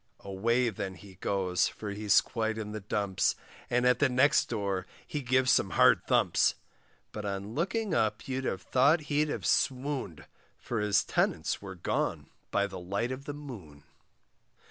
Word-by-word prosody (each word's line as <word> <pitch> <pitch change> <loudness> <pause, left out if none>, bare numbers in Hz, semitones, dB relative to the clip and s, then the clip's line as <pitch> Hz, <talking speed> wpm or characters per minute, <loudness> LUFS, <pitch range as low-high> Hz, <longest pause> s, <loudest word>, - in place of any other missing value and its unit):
Away 115 +6 +1
then 95 -2 -5
he 95 +3 -13
goes, 95 -2 +1
for 105 -2 -6
he's 105 0 +4
quite 110 -1 -2
in 105 -1 -5
the 110 - -4
dumps, 100 -1 0 0.3
And 125 +1 +2
at 125 0 +4
the 145 - +4
next 130 +3 +4
door 100 -5 -2 0.2
he 150 - -4
gives 130 0 +2
some - - +3
hard - - +6
thumps; - - +3 0.6
But 105 - -6
on 100 +1 -4
looking 195 - -1
up 105 -6 0
you'd 130 0 -2
have 95 -6 -2
thought 145 +6 +3
he'd 150 +1 +2
have - - -4
swooned, 130 - 0 0.3
For 120 - -4
his 105 -1 +2
tenants - - 0
were 95 -2 -8
gone 85 - -2 0.2
by 100 0 +1
the 95 -2 -7
light 100 +7 -2
of 130 +2 -6
the 145 - -5
moon. 100 - -10
110 Hz, 165 wpm, -30 LUFS, 100-130 Hz, 0.6 s, hard